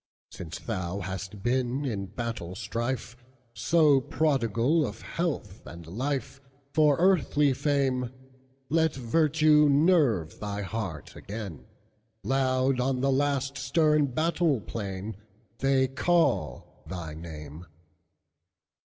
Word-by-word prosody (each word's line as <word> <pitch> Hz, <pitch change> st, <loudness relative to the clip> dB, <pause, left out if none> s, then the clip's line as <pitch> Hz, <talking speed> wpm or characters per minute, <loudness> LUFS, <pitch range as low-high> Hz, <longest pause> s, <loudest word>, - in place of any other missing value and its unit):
"Since 85 Hz, -2 st, -7 dB
thou 95 Hz, -3 st, -4 dB
hast 95 Hz, +1 st, -6 dB
been, 130 Hz, +3 st, 0 dB
in 100 Hz, -7 st, -3 dB
battle 105 Hz, -4 st, -5 dB
strife, 120 Hz, +2 st, -3 dB, 0.4 s
So 150 Hz, -4 st, +4 dB
prodigal 135 Hz, +1 st, +1 dB
of 110 Hz, -4 st, -5 dB
health 145 Hz, -, -3 dB
and 85 Hz, -1 st, -10 dB
life, 135 Hz, -, -3 dB, 0.3 s
For 150 Hz, -3 st, +4 dB
earthly 155 Hz, -6 st, +3 dB
fame, 130 Hz, -3 st, 0 dB, 0.6 s
Let 160 Hz, +1 st, +2 dB
virtue 150 Hz, +3 st, +4 dB
nerve 140 Hz, -, +3 dB
thy 105 Hz, -1 st, -4 dB
heart 95 Hz, -8 st, -5 dB
again; 100 Hz, -6 st, -7 dB, 0.6 s
Loud 130 Hz, -1 st, +1 dB
on 130 Hz, 0 st, 0 dB
the 135 Hz, 0 st, +2 dB
last 140 Hz, 0 st, 0 dB
stern 150 Hz, +1 st, +3 dB
battle 155 Hz, +1 st, +1 dB
plainThey 110 Hz, +7 st, -3 dB
call 175 Hz, +2 st, 0 dB
thy 85 Hz, -4 st, -6 dB
name. 80 Hz, 0 st, -9 dB
130 Hz, 100 wpm, -28 LUFS, 100-145 Hz, 0.6 s, So